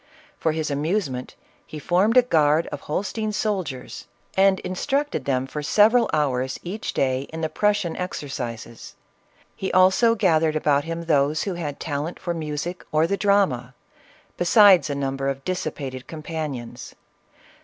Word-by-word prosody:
For 160 Hz, -, +1 dB
his 155 Hz, -1 st, -2 dB
amusement 145 Hz, -3 st, -2 dB, 0.3 s
he 155 Hz, -, -9 dB
formed 185 Hz, -, +2 dB
a 250 Hz, -, +8 dB
guard 155 Hz, -7 st, +3 dB
of 145 Hz, -, -5 dB
Holstein 210 Hz, +8 st, -3 dB
soldiers, 185 Hz, -, -3 dB, 0.3 s
and 190 Hz, 0 st, +4 dB
instructed 270 Hz, -, -2 dB
them 130 Hz, -2 st, 0 dB
for 150 Hz, +3 st, -5 dB
several 220 Hz, +9 st, +4 dB
hours, 130 Hz, -3 st, 0 dB
each 195 Hz, +5 st, -4 dB
day, 130 Hz, 0 st, 0 dB
in 160 Hz, 0 st, -6 dB
the 160 Hz, -, -1 dB
Prussian 205 Hz, -1 st, 0 dB
exercises. 125 Hz, -9 st, -6 dB, 0.6 s
He 190 Hz, -, -3 dB
also 190 Hz, +6 st, +4 dB
gathered 160 Hz, -7 st, +2 dB
about 145 Hz, -2 st, +2 dB
him 165 Hz, +1 st, -4 dB
those 150 Hz, -1 st, +2 dB
who 195 Hz, -, -2 dB
had 150 Hz, -5 st, -5 dB
talent 150 Hz, +3 st, -3 dB
for 175 Hz, -, -3 dB
music 160 Hz, +2 st, -4 dB
or 155 Hz, +1 st, +3 dB
the 200 Hz, -, 0 dB
drama, 180 Hz, -, +1 dB, 0.6 s
besides 185 Hz, -3 st, +6 dB
a 145 Hz, -, -2 dB
number 135 Hz, 0 st, -2 dB
of 135 Hz, 0 st, -4 dB
dissipated 135 Hz, -8 st, -4 dB
companions. 155 Hz, -6 st, -6 dB
160 Hz, 145 wpm, -23 LUFS, 140-190 Hz, 0.6 s, a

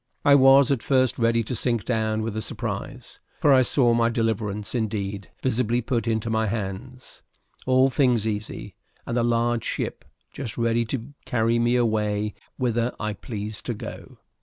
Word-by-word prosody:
I 145 Hz, -, +7 dB
was 135 Hz, 0 st, +6 dB
at 135 Hz, -5 st, +1 dB
first 130 Hz, -1 st, +1 dB
ready 115 Hz, 0 st, +2 dB
to 125 Hz, -, -4 dB
sink 120 Hz, -1 st, 0 dB
down 110 Hz, -2 st, 0 dB
with 115 Hz, -1 st, -3 dB
the 110 Hz, -, -3 dB
surprise; -, -, -5 dB, 0.2 s
for 145 Hz, -, +5 dB
I 130 Hz, -, +6 dB
saw 125 Hz, -1 st, +4 dB
my 115 Hz, 0 st, +3 dB
deliverance 110 Hz, -3 st, -1 dB
indeed 100 Hz, -4 st, -3 dB
visibly 120 Hz, -2 st, +1 dB
put 120 Hz, -1 st, -2 dB
into 110 Hz, 0 st, 0 dB
my 110 Hz, -1 st, +1 dB
hands, 110 Hz, +5 st, -6 dB, 0.5 s
all 130 Hz, +1 st, +4 dB
things 125 Hz, -6 st, +2 dB
easy, 105 Hz, -1 st, -4 dB, 0.3 s
and 115 Hz, -, -3 dB
a 120 Hz, -, +2 dB
large 120 Hz, 0 st, +1 dB
ship -, -, -3 dB, 0.3 s
just 125 Hz, -6 st, -6 dB
ready 115 Hz, 0 st, +1 dB
to 120 Hz, +4 st, -5 dB
carry 115 Hz, 0 st, +1 dB
me 120 Hz, +1 st, +2 dB
away 105 Hz, -3 st, 0 dB, 0.2 s
whither 120 Hz, -1 st, 0 dB
I 105 Hz, -1 st, -2 dB
pleased 105 Hz, 0 st, -7 dB
to 120 Hz, -, -2 dB
go. -, -, -9 dB
115 Hz, 165 wpm, -24 LUFS, 110-125 Hz, 0.5 s, I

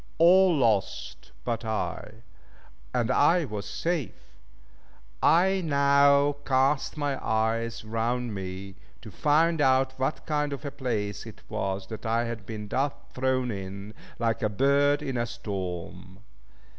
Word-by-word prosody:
All 180 Hz, +1 st, +6 dB
lost 110 Hz, -7 st, -1 dB
but 115 Hz, -1 st, -2 dB
I, 110 Hz, 0 st, -4 dB, 0.7 s
and -, -, 0 dB
I 175 Hz, -1 st, +4 dB
was 105 Hz, -4 st, -5 dB
safe! 165 Hz, -6 st, -3 dB, 0.9 s
I 190 Hz, +3 st, +4 dB
now 140 Hz, -1 st, +4 dB
cast 135 Hz, +3 st, +1 dB
my 145 Hz, -2 st, -2 dB
eyes 115 Hz, +1 st, -1 dB
round 115 Hz, +2 st, -1 dB
me, 95 Hz, 0 st, -6 dB, 0.3 s
to -, -, -9 dB
find 160 Hz, +2 st, +2 dB
out 130 Hz, -1 st, +3 dB
what 135 Hz, +3 st, -2 dB
kind 150 Hz, -2 st, -1 dB
of 140 Hz, +2 st, -7 dB
a 140 Hz, -, -3 dB
place 105 Hz, -6 st, -3 dB
it 110 Hz, -, -12 dB
was 95 Hz, -3 st, -2 dB
that 110 Hz, 0 st, -6 dB
I 115 Hz, +1 st, +1 dB
had 115 Hz, -4 st, -6 dB
been 105 Hz, -2 st, -6 dB
thus 135 Hz, +6 st, 0 dB, 0.2 s
thrown 130 Hz, -1 st, 0 dB
in, 100 Hz, +1 st, -7 dB, 0.2 s
like 115 Hz, 0 st, 0 dB
a 110 Hz, -, +1 dB
bird 140 Hz, +6 st, +2 dB
in 135 Hz, -3 st, -3 dB
a 120 Hz, 0 st, 0 dB
storm. 95 Hz, -4 st, -6 dB
120 Hz, 135 wpm, -27 LUFS, 110-140 Hz, 0.9 s, All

